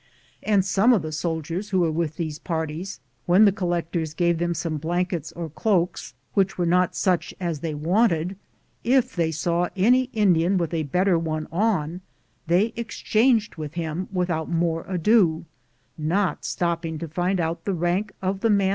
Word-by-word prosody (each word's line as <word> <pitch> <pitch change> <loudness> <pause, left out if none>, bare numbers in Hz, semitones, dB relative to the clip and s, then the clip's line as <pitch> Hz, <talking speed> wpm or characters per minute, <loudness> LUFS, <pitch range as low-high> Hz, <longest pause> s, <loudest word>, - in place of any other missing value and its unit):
And 200 -3 +2
some 200 +6 +4
of 200 -9 +2
the 155 - -4
soldiers 165 +4 -3
who 190 -3 +2
were 165 0 +1
in 155 - -3
these 155 -3 -4
parties, 165 +3 -4 0.3
when 185 +5 +6
the 200 - +6
collec 175 -3 -2
tors 160 -3 -2
gave 170 -1 +1
them 170 0 0
some 160 -1 -2
blankets 175 +1 -2
or 170 -1 -5
cloaks 180 +2 -1 0.2
which 195 -2 +1
were 175 - +1
not 180 +1 +2
such 180 -3 0
as 170 -5 -2
they 155 0 -3
wanted, 175 +2 +1 0.5
if 255 +1 +2
they 165 -2 +1
saw 170 +3 0
any 245 +7 +4
Indian 195 -6 +2
with 170 -3 -1
a 165 - 0
better 180 +2 +2
one 155 -1 -3
on, 180 -3 0 0.5
they 195 +7 +2
ex 230 -2 -6
changed 225 -2 +2
with 155 0 -6
him 170 +2 -3
without 175 -4 -1
more 165 -1 0
ado, 180 -2 +2 0.5
not 175 +5 0
stopping 170 -2 -2
to 165 - -5
find 180 +4 -1
out 165 0 -2
the 200 - 0
rank 175 +5 0
of 190 +1 -1
the 225 - +1
man. 200 -2 +3
175 Hz, 175 wpm, -24 LUFS, 165-195 Hz, 0.5 s, when